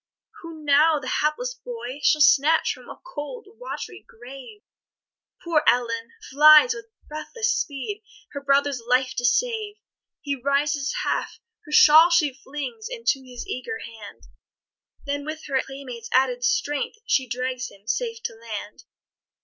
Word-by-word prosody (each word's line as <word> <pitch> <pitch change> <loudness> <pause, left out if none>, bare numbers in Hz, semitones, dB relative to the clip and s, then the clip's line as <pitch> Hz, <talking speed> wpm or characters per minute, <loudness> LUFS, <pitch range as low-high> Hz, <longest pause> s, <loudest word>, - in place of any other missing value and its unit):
Who 330 -2 -10
now 300 +2 +5
the 260 - -8
hapless 305 - -1
boy 460 - -8
shall 300 +2 +3
snatch 300 +2 +4
From - - -15
a - - -10
cold 460 +3 -7
wat'ry - - -7
grave? 270 - -12 0.8
Poor 330 -3 +2
Ellen 230 -2 +1 0.2
flies, 305 - +7
with 445 -3 -9 0.2
breathless 435 +10 -2
speed, 295 - -4 0.3
Her 280 - -6
brother's 280 -2 +1
life 255 +1 +2
to 245 - -1
save. 430 - 0 0.5
He 285 -3 -2
rises 280 +1 0
half - - -2 0.3
her 300 - -12
shawl 315 +3 +8
she 325 -5 +3
flings 295 - -7
Into 460 - -1
his 245 -2 -9
eager 445 - -5
hand, 225 - -11 0.8
Then, 285 0 -3
with 310 +2 -7
her 270 -2 0
playmate's 255 -4 -9
added 485 - +2
strength, 445 - 0
She 265 - +1
drags 255 +1 -3
him 200 +1 -20
safe 460 - -3
to - - -3
land. 220 -2 -8
290 Hz, 140 wpm, -24 LUFS, 255-365 Hz, 0.8 s, shawl